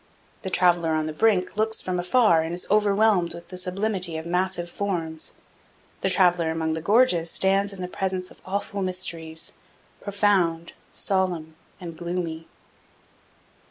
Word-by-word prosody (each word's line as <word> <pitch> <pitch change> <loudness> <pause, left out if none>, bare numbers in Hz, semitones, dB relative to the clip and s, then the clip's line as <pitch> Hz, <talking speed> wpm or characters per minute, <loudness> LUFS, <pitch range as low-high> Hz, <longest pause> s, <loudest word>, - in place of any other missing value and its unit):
The 190 - -4
traveler 175 -3 +3
on 155 0 0
the 155 - -4
brink 195 +2 +1
looks 220 +1 +1
from 180 -1 -2
afar 180 -2 +4
and 165 +2 -3
is 180 - -4
overwhelmed 205 -3 +3
with 170 - -11
the 185 - -8
sublimity 185 -2 -1
of 160 - -6
massive 180 0 0
forms; 170 -4 -2 0.7
the 190 - +1
traveler 180 -3 +3
among 160 0 -1
the 160 - -3
gorges 200 -4 +3
stands 195 +3 +2
in 195 -2 -8
the 180 - -3
presence 185 0 -3
of - - -18
awful 200 +1 -3
mysteries, 170 -4 -3 0.5
profound, 190 -5 +1 0.2
solemn, 180 -5 -1 0.3
and 170 -2 -8
gloomy. 170 -1 -4
180 Hz, 145 wpm, -25 LUFS, 165-195 Hz, 0.7 s, afar